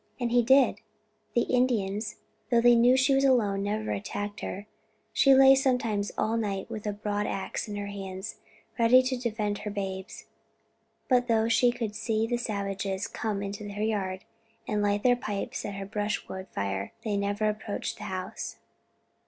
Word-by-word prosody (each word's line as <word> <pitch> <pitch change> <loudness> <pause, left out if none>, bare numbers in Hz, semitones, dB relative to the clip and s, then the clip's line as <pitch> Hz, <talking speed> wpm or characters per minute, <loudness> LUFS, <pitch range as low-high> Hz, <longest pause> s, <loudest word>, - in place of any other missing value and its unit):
And 240 -2 -1
he 245 0 +5
did; 265 +3 +4 0.6
the 235 - +4
Indians, 215 -4 0 0.3
though 235 -1 +4
they 240 +1 +6
knew 240 +2 +5
she 265 +1 +4
was 270 0 +3
alone, 220 -7 +3
never 210 +2 -2
attacked 205 +1 -4
her. 200 +2 -5 0.5
She 275 - +5
lay 270 0 +8
sometimes 245 -6 +1
all 225 +1 +1
night 200 -1 -3
with 215 -2 -5
a - - +1
broadax 205 0 -3
in 205 - -5
her 205 0 -3
hands, 195 0 -6 0.4
ready 245 +3 +6
to 255 0 -1
defend 215 -4 -2
her 210 - -5
babes; 195 -2 -5 0.8
but 250 -1 +3
though 225 -1 +3
she 240 +1 +4
could 225 -3 -4
see 220 0 0
the 240 +1 -1
savages 200 -3 -2
come 210 -3 -3
into 205 +1 -5
her 205 +1 -3
yard 195 -4 -2 0.4
and 210 -1 0
light 205 0 +1
their 245 -1 +5
pipes 210 -4 -4
at 200 - -4
her 195 0 -5
brushwood 205 -2 -3
fire, 100 0 -3
they 215 -2 -1
never 200 +1 0
approached 210 -1 -3
the - - -6
house?" 185 0 -5
210 Hz, 170 wpm, -28 LUFS, 200-235 Hz, 0.8 s, lay